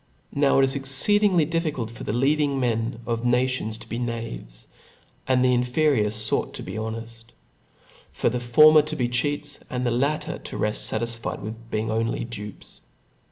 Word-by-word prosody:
Now 140 -1 +3
it 135 - +5
is 135 0 +3
exceeding 180 +9 +4
difficult 150 -9 -2
for 115 - -9
the - - -2
leading 140 +3 +1
men 115 -2 -1
of 115 -1 -2
the 125 - -1
nation 125 -1 +1
to 110 0 -6
be 115 - -4
knaves, 115 - -6 0.6
and 130 -1 +3
the 125 - +4
inferior 125 -2 +2
fort 110 +1 0
to - - -7
be - - -7
honeft; 115 +1 -6 0.9
for - - -1
the 125 +1 0
former 155 +6 +6
to 155 +1 -3
be 125 -4 0
cheats^ 145 +4 -2
and 125 0 -3
the 120 - +1
latter 140 +6 -1
to - - -7
reft 105 0 -1
fatisfied 115 +1 -3
with 115 +2 -8
being 110 0 -2
on 115 +1 0
ly - - -3
dupes. 105 -3 -9
120 Hz, 175 wpm, -24 LUFS, 115-140 Hz, 0.9 s, former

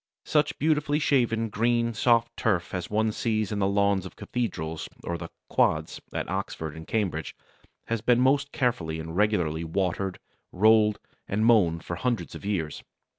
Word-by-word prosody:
Such 150 -1 +1
beautifully 150 -1 +1
shaven, 120 -7 +1
green, 115 +2 +1
soft 115 +1 +2
turf 95 -6 0
as 90 -2 -3
one 110 +1 +1
sees 110 -2 -1
in 105 - -1
the 95 - +2
lawns 100 -1 +2
of 95 - -9
cathedrals 80 -10 -3
or 85 - -2
the 85 0 -6 0.2
"quads" 80 0 +1
at - - -3
Oxford 80 -2 -4
and 80 0 -9
Cambridge 90 -9 -2 0.5
has 115 -2 -2
been 120 +1 +3
most 140 +2 +3
carefully 85 -11 -1
and 80 +1 -6
regularly 90 -6 +1
watered, 90 +2 -1 0.3
rolled, 105 +1 +4 0.3
and 105 +3 0
mown 90 -8 +4
for 85 - -5
hundreds 120 +4 -2
of - - -9
years. 95 -7 -2
105 Hz, 160 wpm, -27 LUFS, 85-115 Hz, 0.5 s, rolled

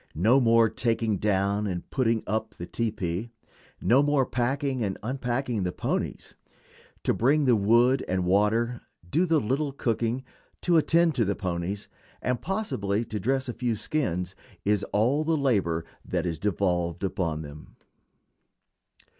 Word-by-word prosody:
No 115 +10 +5
more 115 -1 +5
taking 115 -2 0
down 100 +1 +1
and 90 -3 -4
putting 115 -4 +1
up 110 +1 -2
the 85 - -6
tepee; 105 -1 -2 0.5
no 130 +4 +4
more 145 -2 +2
packing 130 +2 -1
and 95 -2 -2
unpacking 125 -1 -2
the 90 -1 -1
ponies. - - -3 0.7
To - - +2
bring 140 +5 +3
the 125 -3 +5
wood 120 +5 +4
and 90 -1 0
water, 110 +6 +2 0.3
do 170 - +1
the 160 -2 +3
little 140 +5 -1
cooking, 120 -1 -1 0.4
to 175 -2 +3
attend 165 +1 +4
to 120 - +1
the 100 -1 0
ponies, 95 +1 -3 0.3
and 125 -1 -1
possibly 115 - -1
to 110 -2 -4
dress 130 +6 0
a 120 - -3
few 120 -2 -1
skins 100 - -2 0.3
is 105 -1 +2
all 125 +9 +1
the 160 0 +1
labor 95 - +1 0.2
devolved 90 0 -1
upon 90 -5 -1
them. 75 +1 -11
115 Hz, 140 wpm, -27 LUFS, 95-130 Hz, 0.7 s, No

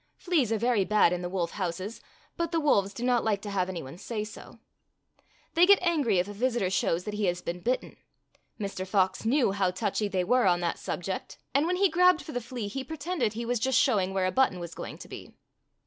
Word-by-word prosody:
Fleas 310 - +1
are 225 - +2
very 235 -2 +2
bad 205 -3 +3
in 180 - -2
the 175 - -4
wolf 175 -2 -2
houses, 190 +3 -4 0.3
but 335 -1 -2
the 330 - +1
wolves 200 -10 +2
do 235 - -7
not 245 -1 +2
like 215 -3 +1
to 205 - -5
have 190 -2 0
any 175 -3 -5
one 135 +6 -10
say 215 +1 -4
so. 215 0 -11 1.0
They 350 +2 +5
get 400 0 +8
angry 295 - +2
if 180 +2 +1
a 205 - -7
visitor 230 -3 0
shows 175 -2 +1
that 210 - -5
he 210 0 -1
has 175 -1 -1
been 175 +1 -4
bitten. 245 +7 -2 0.6
Mr. 195 -2 -4
Fox 190 +1 +1
knew 245 -2 +3
how 195 -2 +1
touchy 205 +3 -1
they 185 -2 0
were 245 +3 +3
on 175 -1 +3
that 170 -1 -1
subject, 185 +2 -4 0.2
and 285 +4 +3
when 360 - +1
he 395 +2 +4
grabbed 360 0 +4
18 - - -14
Fairy 310 - -7
Tale 245 - -1
Foxes 235 - -13
for 260 - -9
the 245 - -3
flea 205 - -2
he 265 +6 -4
pretended 315 - -2
he 235 +2 -4
was 245 0 0
just 260 +2 +2
showing 205 -9 +3
where 190 -1 0
a 185 - +1
button 260 -7 +2
was 170 -1 -7
going - - -7
to - - -11
be. - - -10
210 Hz, 250 wpm, -28 LUFS, 185-260 Hz, 1.0 s, get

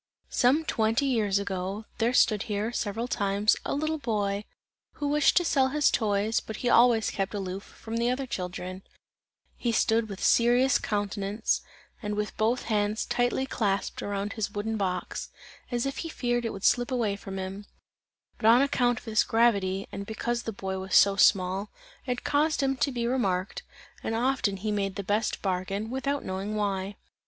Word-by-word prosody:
Some 275 +6 +3
twenty 225 +1 +1
years 215 -7 +2
ago, 200 +1 -3
there 230 +1 +2
stood 215 -4 +4
here, 210 +2 -1
several 230 0 -2
times, 205 -2 +2
a - - -2
little 310 +2 -1
boy, 205 -5 -1 0.5
who 290 - -3
wished 295 0 +3
to 350 - +4
sell 270 -4 +3
his 295 +2 +2
toys, 215 0 +1
but 220 - -7
he 245 - -1
always 235 -2 +5
kept 195 +1 -2
aloof 190 -1 -4
from 225 +2 -7
the 235 +1 +1
other 260 +2 -1
children; 185 -3 -5 0.8
he 240 - 0
stood 225 0 +2
with 195 -1 -7
serious 245 +3 +4
countenance 205 +1 -1 0.4
and 210 -2 -3
with 210 0 -3
both 230 +3 +1
hands 210 -1 0
tightly 245 +2 0
clasped 205 -7 -1
around 205 +1 -3
his 220 -3 -2
wooden 210 +2 -3
box, 185 -3 -3 0.4
as 240 0 -1
if 275 0 -3
he 330 - -4
feared 240 -5 -1
it - - 0
would 195 - -6
slip 245 0 +3
away 235 -6 0
from 195 -1 -7
him; 190 +2 -6 0.7
but 215 - +2
on 240 +4 +7
account 245 -4 +2
of - - -9
this 220 -1 +2
gravity, 200 -4 +2
and 200 0 -6
because 235 +2 -2
the 225 - -4
boy 190 -2 -4
was 190 0 -2
so 200 0 +6
small, 195 0 +3 0.4
it 250 -1 -2
caused 295 0 +1
him 270 0 +1
to 260 +2 0
be 240 -2 -2
remarked, 195 -7 -1 0.4
and 225 - -2
often 235 -4 +1
he 210 +3 -2
made 195 -2 -1
the 200 - -4
best 205 +3 -1
bargain, 195 +3 -2
without 275 +2 -2
knowing 195 +3 -3
why. 200 -1 -2
215 Hz, 180 wpm, -28 LUFS, 200-245 Hz, 0.8 s, on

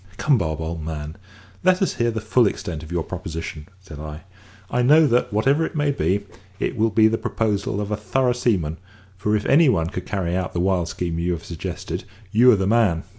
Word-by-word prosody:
"Come, 140 -6 +3
Bob, 80 -3 -2
old 80 0 -4
man, 75 0 -5 0.5
let 185 0 +4
us 190 - 0
hear 120 0 +2
the 110 -1 -2
full 110 +1 +3
extent 85 -5 -4
of 80 +1 -11
your 85 -2 -1
proposition," 80 -4 -6
said 85 -6 -11
I. 75 +1 -7 0.5
"I 125 - +1
know 150 +6 +6
that, 125 -3 +2
whatever 135 +9 +2
it - - -4
may 145 -1 +1
be, 100 -7 0 0.3
it - - -1
will 115 0 +2
be 110 +1 +5
the 115 +1 0
proposal 105 -2 -1
of 105 0 -3
a 105 - 0
thorough 125 +5 +1
seaman, 95 -11 0 0.4
for 105 +3 0
if 105 - -1
any 145 +2 +5
one 85 -8 +1
could 90 - -6
carry 90 -3 -1
out 95 0 -2
the 85 - -1
wild 90 -2 +1
scheme 85 -1 -3
you 90 +1 0
have 85 -1 -6
suggested, 85 -2 -5 0.3
you 120 +4 +6
are - - +5
the 95 - 0
man." 100 -6 +2
100 Hz, 220 wpm, -22 LUFS, 85-120 Hz, 0.5 s, know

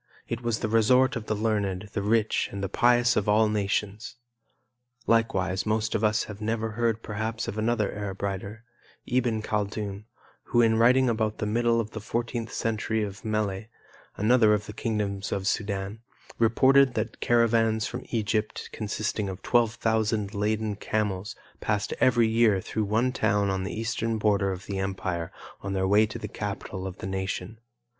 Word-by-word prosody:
It 115 0 -3
was 120 -2 -1
the 110 - 0
resort 125 +4 +4
of 115 -2 -5
the 110 - 0
learned, 105 -2 -1
the 100 - -1
rich, 110 +1 +1
and 100 0 -5
the - - 0
pious 120 +3 +3
of 105 0 +1
all 110 +1 +5
nations. 105 +2 -2 0.9
Likewise, 95 -5 +1
most 110 0 0
of 105 - 0
us 105 0 +2
have 105 0 -9
never 110 +1 -1
heard 115 0 0
perhaps 110 +2 -3
of - - -4
another 110 -1 0
Arab 100 -1 -5
writer, 100 +3 -4 0.4
Iben 120 -3 0
Khaldun, 105 -1 -3 0.4
who 120 - +1
in 115 -1 +4
writing 130 +3 +5
about 110 -2 0
the - - -2
middle 115 +2 +2
of 110 -1 -3
the 110 - -6
fourteenth 115 +1 -3
century 110 -1 -1
of 100 -1 -6
Melle, 110 -2 -1 0.5
another 110 0 +4
of 105 0 -4
the 105 - -8
kingdoms 100 -3 -2
of 100 - -1
the - - -8
Sudan, 100 -1 -2 0.4
reported 130 +3 +5
that 110 0 -3
caravans 115 -2 +2
from 125 +1 -5
Egypt 110 -1 -2
consisting 105 -1 -2
of 95 0 -7
twelve 115 -2 +2
thousand 110 -2 0
laden 105 0 -1
camels 105 0 -2 0.2
passed 105 -2 -1
every 120 -2 +4
year 110 -3 +3
through 110 +3 -2
one 115 +5 +1
town 105 -5 +1
on 95 0 -2
the 105 - -4
eastern 115 0 -1
border 100 -2 +2
of 95 0 -6
the 100 -1 -3
empire 95 -3 -3 0.3
on 100 0 -4
their 95 -1 +1
way 105 +2 +5
to - - -6
the - - -6
capital 95 0 -5
of 95 0 -7
the - - -7
nation. 95 +2 -4
110 Hz, 175 wpm, -27 LUFS, 100-115 Hz, 0.9 s, all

